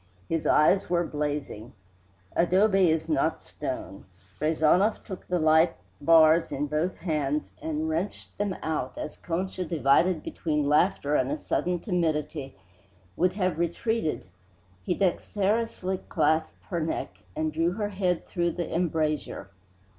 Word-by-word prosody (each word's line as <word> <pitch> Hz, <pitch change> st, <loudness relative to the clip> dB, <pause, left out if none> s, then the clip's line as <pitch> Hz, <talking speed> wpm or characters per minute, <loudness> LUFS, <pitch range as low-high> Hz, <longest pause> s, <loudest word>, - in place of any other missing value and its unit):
His 165 Hz, -1 st, -1 dB
eyes 185 Hz, +6 st, +4 dB
were 175 Hz, 0 st, +2 dB
blazing. 145 Hz, -6 st, -4 dB, 0.6 s
Adobe 190 Hz, +1 st, +4 dB
is 160 Hz, 0 st, 0 dB
not 155 Hz, 0 st, +1 dB
stone. 130 Hz, -8 st, -6 dB, 0.3 s
Rezanov 160 Hz, +7 st, +2 dB
took 190 Hz, -, -8 dB
the 180 Hz, -, +1 dB
light 160 Hz, +1 st, +4 dB, 0.3 s
bars 165 Hz, 0 st, +5 dB
in 145 Hz, -, -1 dB
both 155 Hz, +5 st, -1 dB
hands 150 Hz, -, -1 dB
and 155 Hz, 0 st, -2 dB
wrenched 165 Hz, +6 st, -3 dB
them 205 Hz, -2 st, -1 dB
out; 150 Hz, -5 st, -2 dB
then, -, -, -4 dB
as -, -, -9 dB
Concha, 185 Hz, +2 st, -3 dB
divided 160 Hz, +2 st, +2 dB
between 150 Hz, -3 st, -1 dB
laughter 150 Hz, -1 st, +2 dB
and 130 Hz, -2 st, +2 dB
a 150 Hz, -, -1 dB
sudden 180 Hz, +3 st, -1 dB
timidity, 155 Hz, -, -2 dB, 0.6 s
would 180 Hz, +1 st, +2 dB
have 185 Hz, -5 st, -1 dB
retreated, 170 Hz, +1 st, -1 dB, 0.6 s
he -, -, -1 dB
dexterously 195 Hz, +1 st, 0 dB
clasped 160 Hz, 0 st, +1 dB
her 170 Hz, -, 0 dB
neck 160 Hz, 0 st, -3 dB, 0.2 s
and 155 Hz, 0 st, -1 dB
drew 165 Hz, +3 st, +1 dB
her 205 Hz, +1 st, -2 dB
head 185 Hz, -3 st, -1 dB
through 175 Hz, -2 st, -1 dB
the 175 Hz, -, -4 dB
embrasure. 155 Hz, -, -1 dB
165 Hz, 135 wpm, -27 LUFS, 150-180 Hz, 0.6 s, bars